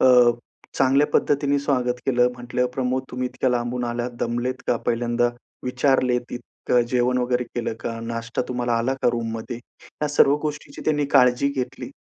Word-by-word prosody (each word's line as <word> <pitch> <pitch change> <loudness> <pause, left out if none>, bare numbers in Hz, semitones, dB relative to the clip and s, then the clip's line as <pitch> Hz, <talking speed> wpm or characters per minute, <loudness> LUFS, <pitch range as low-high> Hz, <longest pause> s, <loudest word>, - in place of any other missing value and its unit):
अ, - - +5 0.7
चांगल्या 135 +2 +4
पद्धतीने 145 0 +2
स्वागत 125 -3 0
केलं. 125 -1 +4
म्हटलं 125 +1 -1
प्रमोद, 130 0 0
तुम्ही 125 0 -2
इतक्या 130 +1 -1
लांबून 120 0 -1
आलात, 120 +1 -2
दमलेत 120 +2 -1
का? 120 - +2
पहिल्यांदा 120 0 +1 0.4
विचारलेत 125 -1 +1
इतकं 120 0 -1
जेवण 125 0 +2
वगैरे 125 0 0
केलं 120 -1 -4
का? 115 -1 -4
नाश्ता 115 +1 -3
तुम्हाला 125 -1 -1
आला 130 +3 0
का - - +4
रूममध्ये? 115 +1 -3 0.5
या 150 - +1
सर्व 145 0 +5
गोष्टींची 150 -1 -5
त्यांनी 150 -2 +2
काळजी 125 +2 +5
घेतली. 125 - -4
125 Hz, 155 wpm, -23 LUFS, 120-130 Hz, 0.7 s, अ